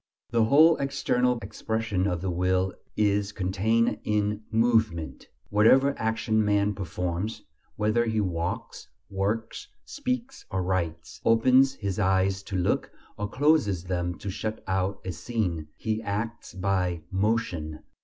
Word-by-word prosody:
The 115 Hz, -2 st, +3 dB
whole 155 Hz, +7 st, +6 dB
external 125 Hz, -3 st, +1 dB
expression 110 Hz, -4 st, -2 dB
of 90 Hz, -3 st, -1 dB
the 95 Hz, -1 st, -1 dB
will 90 Hz, +1 st, +1 dB, 0.2 s
is 105 Hz, -1 st, +2 dB
contained 105 Hz, +5 st, +1 dB
in 105 Hz, 0 st, 0 dB
movement: 110 Hz, -7 st, +1 dB, 0.2 s
whatever 130 Hz, +7 st, +5 dB
action 110 Hz, -1 st, 0 dB
man 105 Hz, 0 st, +2 dB
performs, 90 Hz, +3 st, -3 dB, 0.3 s
whether 110 Hz, +3 st, +2 dB
he 110 Hz, -1 st, 0 dB
walks, 85 Hz, -3 st, -3 dB, 0.2 s
works, 105 Hz, +4 st, -2 dB, 0.2 s
speaks 255 Hz, -2 st, -4 dB
or 95 Hz, -1 st, -1 dB
writes, 90 Hz, -3 st, -3 dB
opens 130 Hz, +4 st, +5 dB
his 100 Hz, -3 st, -3 dB
eyes 95 Hz, -1 st, +2 dB
to 95 Hz, -, -3 dB
look, 90 Hz, -1 st, 0 dB, 0.3 s
or 105 Hz, 0 st, -4 dB
closes 135 Hz, -, +2 dB
them 90 Hz, -1 st, -2 dB
to 100 Hz, -, -5 dB
shut 110 Hz, +2 st, -4 dB
out 95 Hz, +1 st, -1 dB
a 95 Hz, -, -2 dB
scene, 85 Hz, -3 st, -2 dB
he 110 Hz, 0 st, -2 dB
acts 110 Hz, -1 st, -4 dB
by 90 Hz, -3 st, 0 dB
"motion." 95 Hz, -7 st, -1 dB
105 Hz, 130 wpm, -27 LUFS, 95-115 Hz, 0.3 s, whole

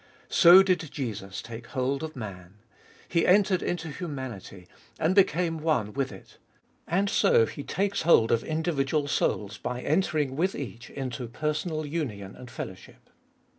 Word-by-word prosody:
So 180 Hz, +2 st, +8 dB
did 185 Hz, -2 st, +2 dB
Jesus 105 Hz, -7 st, -5 dB
take 115 Hz, 0 st, -9 dB
hold 135 Hz, 0 st, -1 dB
of 160 Hz, 0 st, -6 dB
man. 95 Hz, -5 st, -8 dB, 0.5 s
He 170 Hz, -1 st, +1 dB
entered 190 Hz, -1 st, +4 dB
into 165 Hz, -2 st, -3 dB
humanity 130 Hz, -, -7 dB, 0.3 s
and 165 Hz, +3 st, +2 dB
became 175 Hz, -4 st, +2 dB
one 135 Hz, -10 st, 0 dB
with 135 Hz, -1 st, -1 dB
it. 95 Hz, -, -14 dB, 0.5 s
And 190 Hz, +4 st, +1 dB
so 115 Hz, -, +4 dB
he 145 Hz, -, -7 dB
takes 200 Hz, +6 st, -1 dB
hold 155 Hz, -9 st, +5 dB
of 115 Hz, -, +2 dB
individual 155 Hz, -2 st, 0 dB
souls 105 Hz, -6 st, -1 dB
by 125 Hz, 0 st, -4 dB
entering 155 Hz, -4 st, 0 dB
with 185 Hz, +6 st, 0 dB
each 120 Hz, -3 st, -7 dB
into 130 Hz, -2 st, -5 dB
personal 155 Hz, +5 st, -2 dB
union 120 Hz, -, -4 dB
and 125 Hz, -, -11 dB
fellowship. -, -, -9 dB
145 Hz, 145 wpm, -27 LUFS, 115-170 Hz, 0.5 s, So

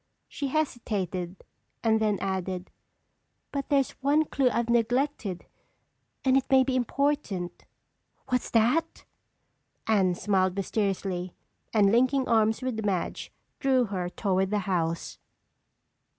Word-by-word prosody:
She 285 Hz, -, -4 dB
hesitated 200 Hz, -, -2 dB, 0.4 s
and 220 Hz, -1 st, +3 dB
then 210 Hz, -2 st, +2 dB
added: 190 Hz, -1 st, -3 dB, 0.8 s
"But 280 Hz, -1 st, -3 dB
there's 275 Hz, -3 st, +2 dB
one 290 Hz, +3 st, +3 dB
clue 270 Hz, -3 st, +2 dB
I've 235 Hz, -1 st, -1 dB
neglected 235 Hz, -4 st, 0 dB, 0.8 s
and 260 Hz, 0 st, +4 dB
it 270 Hz, -, +1 dB
may 265 Hz, -1 st, +6 dB
be 260 Hz, 0 st, -1 dB
important." 250 Hz, -8 st, -1 dB, 0.6 s
"What's 250 Hz, -1 st, 0 dB
that?" 250 Hz, +9 st, +1 dB, 0.8 s
Anne 190 Hz, -5 st, +3 dB
smiled 190 Hz, -1 st, +1 dB
mysteriously, 195 Hz, -3 st, -2 dB, 0.4 s
and 205 Hz, -3 st, +4 dB
linking 255 Hz, +3 st, +3 dB
arms 220 Hz, +1 st, +2 dB
with 235 Hz, -4 st, -2 dB
Madge, 190 Hz, -4 st, -2 dB, 0.3 s
drew 265 Hz, -2 st, +3 dB
her 185 Hz, -4 st, -3 dB
toward 190 Hz, 0 st, 0 dB
the 210 Hz, -, +1 dB
house. 170 Hz, -3 st, -2 dB
220 Hz, 115 wpm, -27 LUFS, 190-260 Hz, 0.8 s, may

